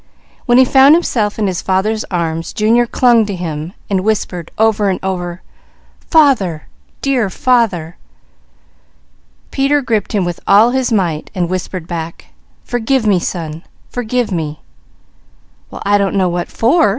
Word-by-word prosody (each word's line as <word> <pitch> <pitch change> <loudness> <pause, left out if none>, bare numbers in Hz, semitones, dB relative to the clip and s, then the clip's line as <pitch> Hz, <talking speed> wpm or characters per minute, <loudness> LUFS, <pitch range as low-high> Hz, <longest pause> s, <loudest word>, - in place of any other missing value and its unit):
When 240 0 +4
he 260 - +7
found 270 +4 +6
himself 220 -11 0
in 215 - 0
his 185 -3 -2
father's 210 +4 0
arms 165 -2 -3
Junior 230 +3 +2
clung 240 -2 +3
to 200 - -3
him 165 -1 -5
and 190 -2 0
whispered 185 -5 -2
over 215 -2 +2
and 185 - -1
over: 180 -2 -4 0.7
"Father, 250 - +3 0.4
dear 255 -7 +1
father!" 195 -8 0 1.5
Peter 280 +1 +1
gripped 220 -4 -1
him 200 -4 +1
with 175 -1 -4
all 215 +4 +5
his 260 -1 0
might 175 -8 -1
and 180 -2 0
whispered 185 -1 -4
back: 165 -1 -7 0.3
"Forgive 245 +1 0
me 200 -4 +3
son! 165 -3 -5 0.3
Forgive 245 -1 -2
me!" 155 -4 -3 1.1
"Well - - -9
I 205 0 +3
don't 200 0 0
know 185 -2 +2
what 175 0 -2
for?" 240 +1 +2
200 Hz, 145 wpm, -15 LUFS, 175-240 Hz, 1.5 s, he